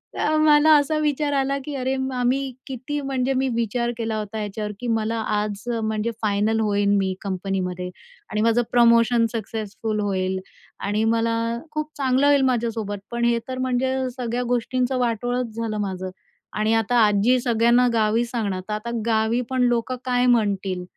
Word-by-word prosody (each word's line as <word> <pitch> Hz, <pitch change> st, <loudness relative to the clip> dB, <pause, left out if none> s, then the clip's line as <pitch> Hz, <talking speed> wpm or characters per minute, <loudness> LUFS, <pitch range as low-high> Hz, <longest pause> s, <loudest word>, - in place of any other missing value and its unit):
तेव्हा 310 Hz, -, +1 dB
मला 310 Hz, 0 st, +5 dB
असा 290 Hz, +2 st, 0 dB
विचार 295 Hz, -1 st, 0 dB
आला 275 Hz, 0 st, +1 dB
की 295 Hz, -, -5 dB
अरे 260 Hz, 0 st, -1 dB
मा 265 Hz, -1 st, -2 dB
मी 260 Hz, +2 st, +2 dB, 0.3 s
किती 265 Hz, +3 st, -4 dB
म्हणजे 270 Hz, -1 st, -1 dB
मी 265 Hz, 0 st, +1 dB
विचार 235 Hz, +1 st, 0 dB
केला 225 Hz, -2 st, -2 dB
होता 215 Hz, 0 st, -4 dB
याच्यावर 210 Hz, 0 st, -4 dB
की 245 Hz, -, -5 dB
मला 225 Hz, 0 st, 0 dB, 0.2 s
आज 210 Hz, -1 st, -2 dB, 0.2 s
म्हणजे 220 Hz, +1 st, -1 dB
फायनल 215 Hz, +1 st, +1 dB
होईन 205 Hz, -1 st, +2 dB
मी 190 Hz, -1 st, 0 dB
कंपनीमध्ये 185 Hz, -2 st, -3 dB, 0.4 s
आणि 215 Hz, -, 0 dB
माझं 230 Hz, +2 st, +3 dB
प्रमोशन 235 Hz, 0 st, +5 dB
सक्सेसफुल 215 Hz, -1 st, -4 dB
होईल 190 Hz, -2 st, -1 dB, 0.4 s
आणि 205 Hz, +2 st, -1 dB
मला 230 Hz, 0 st, +1 dB, 0.4 s
खूप 305 Hz, 0 st, -3 dB
चांगलं 265 Hz, 0 st, +2 dB
होईल 285 Hz, -1 st, +5 dB
माझ्यासोबत. 230 Hz, -5 st, -1 dB
पण 235 Hz, 0 st, 0 dB
हे 235 Hz, 0 st, +2 dB
तर 255 Hz, -, -3 dB
म्हणजे 255 Hz, +1 st, 0 dB, 0.2 s
सगळ्या 245 Hz, 0 st, -2 dB
गोष्टींचं 250 Hz, +2 st, 0 dB
वाटोळच 245 Hz, 0 st, -1 dB
झालं 225 Hz, -2 st, -3 dB
माझं 190 Hz, -2 st, -4 dB, 0.5 s
आणि 215 Hz, +1 st, +2 dB
आता 225 Hz, +2 st, +1 dB
आजी 210 Hz, +5 st, +3 dB
सगळ्यांना 235 Hz, +1 st, +3 dB
गावी 220 Hz, +1 st, +2 dB
सांगणार. 215 Hz, -6 st, -3 dB
तर -, -, -1 dB
आता 215 Hz, +2 st, -4 dB, 0.2 s
गावी 225 Hz, +1 st, +1 dB
पण 260 Hz, -1 st, 0 dB
लोकं 240 Hz, +2 st, 0 dB
काय 250 Hz, -1 st, +2 dB
म्हणतील? 200 Hz, -6 st, +1 dB
230 Hz, 165 wpm, -23 LUFS, 210-255 Hz, 0.5 s, मला